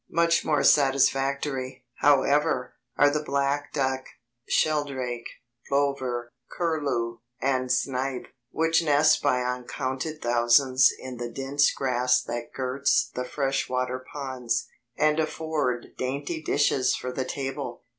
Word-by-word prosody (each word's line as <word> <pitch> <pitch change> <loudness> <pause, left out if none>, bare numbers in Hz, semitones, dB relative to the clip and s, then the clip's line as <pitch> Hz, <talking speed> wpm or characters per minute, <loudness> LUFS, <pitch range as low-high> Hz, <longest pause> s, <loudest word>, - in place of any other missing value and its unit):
Much 170 0 +2
more 150 -3 +1
satisfactory, 135 -1 +2
however, 140 -2 +2 0.2
are 145 0 +5
the 150 +1 -1
black 140 0 -1
duck, 130 -2 -1 0.5
sheldrake, 135 -6 0 0.4
plover, 130 -4 -1 0.2
curlew, 140 -9 -1 0.2
and 130 -1 0
snipe, 130 0 -1 0.2
which 165 +1 +2
nest 155 0 +4
by 125 -3 +2
uncounted 130 +4 -3
thousands 120 +2 +4
in 130 -1 -8
the 120 0 -4
dense 135 +4 +1
grass 125 -1 +1
that 120 -1 -5
girts 135 +1 0
the 125 - -3
fresh 135 +1 -1
water 130 0 -2
ponds, 130 -4 -2 0.3
and 155 +1 +2
afford 155 -6 -2
dainty 145 +5 -3
dishes 140 -4 +2
for 125 - -5
the 130 - -2
table. 135 -2 -5
135 Hz, 115 wpm, -26 LUFS, 125-145 Hz, 0.5 s, are